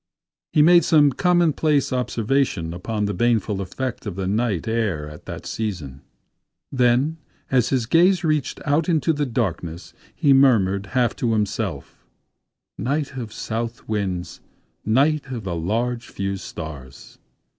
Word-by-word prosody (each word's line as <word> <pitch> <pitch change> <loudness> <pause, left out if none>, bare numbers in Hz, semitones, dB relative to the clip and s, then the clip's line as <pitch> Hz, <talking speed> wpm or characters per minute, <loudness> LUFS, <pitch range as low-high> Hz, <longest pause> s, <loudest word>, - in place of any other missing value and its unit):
He 150 - +5
made 175 +2 +6
some 150 -4 +5
commonplace 155 -4 +2
observation 120 -8 0
upon 105 +4 -2
the 100 - -1
baneful 110 -1 +1
effect 115 +5 -4
of 100 - -4
the 95 0 -3
night 105 -2 0
air 105 -10 -1
at 75 0 -12
the - - -5
season. 80 -12 -5 0.7
Then 130 +5 +2 0.3
as 125 -3 +3
his 130 -4 +1
gaze 175 +8 +4
reached 155 -3 0
out 150 +3 +1
into 165 0 +2
the 145 -1 -1
darkness, 90 -8 -3 0.2
he 145 -5 +4
murmured, 105 -8 +3
half 120 -2 +2
to 115 -2 0
himself: 105 -7 -3 0.8
"'Night 140 +1 -2
of 120 -5 -5
south 115 +2 -4
winds—night 110 - -2
of 125 -4 -5
the 90 -3 -3
large 115 +8 -2
few 100 0 -3
stars! 75 -8 -9
115 Hz, 135 wpm, -22 LUFS, 95-140 Hz, 0.8 s, made